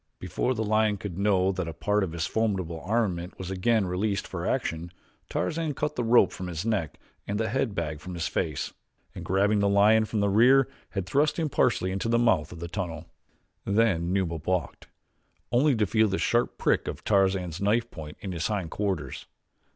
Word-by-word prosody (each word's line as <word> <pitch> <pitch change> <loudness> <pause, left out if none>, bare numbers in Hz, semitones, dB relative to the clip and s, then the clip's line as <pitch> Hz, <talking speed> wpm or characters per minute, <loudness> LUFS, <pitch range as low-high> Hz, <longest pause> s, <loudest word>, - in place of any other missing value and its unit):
Before 125 +7 -1
the 110 - -1
lion 110 -1 +2
could 95 -2 -6
know 95 -2 +3
that 95 -2 -3
a 85 - -4
part 105 +4 +1
of 90 - -3
his 85 -1 -2
formidable 95 -7 -1
armament 95 -5 -1
was 95 0 -6
again 105 +3 +2
released 100 +2 -1
for - - -4
action, 85 +1 -2 0.4
Tarzan 165 0 -1
had 145 - -3
cut 150 +2 -2
the 120 - -1
rope 115 -3 +5
from 90 - -6
his 85 +2 -4
neck 105 -9 -1 0.3
and 100 +1 -2
the 110 0 0
head 125 -2 -1
bag 80 -3 -3
from 90 +3 -8
his 85 - -2
face, - - -2 0.4
and - - -7
grabbing 100 +3 +2
the 100 0 +2
lion 105 +2 +5
from 110 0 -2
the 100 - +2
rear 125 +6 +5 0.2
had 95 -3 -3
thrust 145 +10 +1
him 160 -3 0
partially 120 -8 +1
into 95 +4 -2
the 115 - +3
mouth 115 -10 +2
of 85 - -9
the 85 - -5
tunnel. 85 -3 -4 0.6
Then 100 -5 +2
Numa 90 -4 0
balked, 90 +3 -2 0.6
only 130 +3 +4
to 110 -2 +2
feel 110 +2 +3
the 95 -1 -1
sharp 120 +1 +1
prick - - +1
of - - -5
Tarzan's 95 -4 +1
knife 115 +4 +1
point 75 -2 -9
in 95 - -5
his 85 -2 -2
hind 100 -6 -2
quarters. 100 -2 -3
100 Hz, 200 wpm, -27 LUFS, 90-110 Hz, 0.6 s, rope